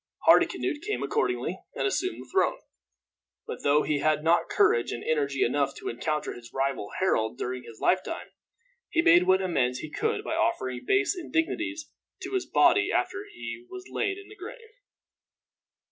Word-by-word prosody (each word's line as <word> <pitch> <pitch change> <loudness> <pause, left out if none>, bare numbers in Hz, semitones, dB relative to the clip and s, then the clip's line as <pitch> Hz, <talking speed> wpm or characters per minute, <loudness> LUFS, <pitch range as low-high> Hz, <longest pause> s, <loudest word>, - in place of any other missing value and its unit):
Hardicanute 295 - +4
came 425 0 -2
accordingly 445 +2 -1 0.2
and - - -1
assumed 375 -1 -1
the - - -19
throne. 395 +6 +2 0.9
But, - - -6
though 145 +1 +3
he 150 -2 0
had 155 0 +1
not 165 +2 +3
courage 120 0 +3
and 120 - -5
energy 140 -3 +1
enough 140 +3 0
to - - -5
encounter 150 +5 -2
his 120 -1 -12
rival 135 -5 -1
Harold 110 -12 +1
during 125 0 -3
his 115 -1 -12
lifetime, 185 - 0 0.6
he 335 - +2
made 345 +1 +6
what 190 0 +4
amends 130 -9 +1
he 155 +3 -7
could - - -1
by - - -3
offering 130 -1 -1
base 400 0 +3
indignities 325 -2 -2 0.3
to 375 - -5
his 380 -1 -1
body 410 - +4
after 385 +3 -1
he 355 - -7
was 375 -1 -9
laid 405 -2 -1
in 400 0 -11
the 420 - -13
grave. 455 +4 -10
190 Hz, 165 wpm, -27 LUFS, -, 0.9 s, made